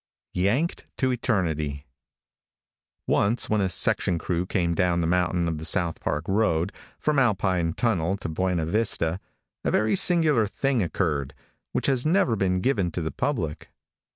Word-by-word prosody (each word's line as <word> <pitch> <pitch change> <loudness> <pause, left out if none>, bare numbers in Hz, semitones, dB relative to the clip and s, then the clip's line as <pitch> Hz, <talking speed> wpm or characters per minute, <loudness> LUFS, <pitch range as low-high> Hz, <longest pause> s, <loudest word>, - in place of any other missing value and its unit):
YANKED 115 - 0
TO 130 -2 +1
ETERNITY. 80 - -1 1.2
|ONCE, 110 +4 +1
when 105 -1 +2
a 95 - +1
section 90 0 +2
crew 90 +1 -2
came 85 -4 0
down 90 -1 +1
the 85 - 0
mountain 90 0 +1
on 80 -2 -2
the 75 - -7
South 85 0 +1
Park 75 +2 -2
road, 95 -3 +1 0.2
from 150 -2 +1
Alpine 95 -8 +1
Tunnel 95 -4 0
to 100 - -6
Buena 85 0 -1
Vista, 90 -3 0 0.4
a - - 0
very 110 0 +2
singular 160 - +3
thing 135 +3 0
occurred, 80 -6 -1 0.4
which - - -2
has 130 -3 +2
never 160 - +2
been 95 -2 0
given 100 -7 +1
to 85 - -4
the 80 - -3
public. 105 - -3
95 Hz, 155 wpm, -25 LUFS, 85-115 Hz, 1.2 s, singular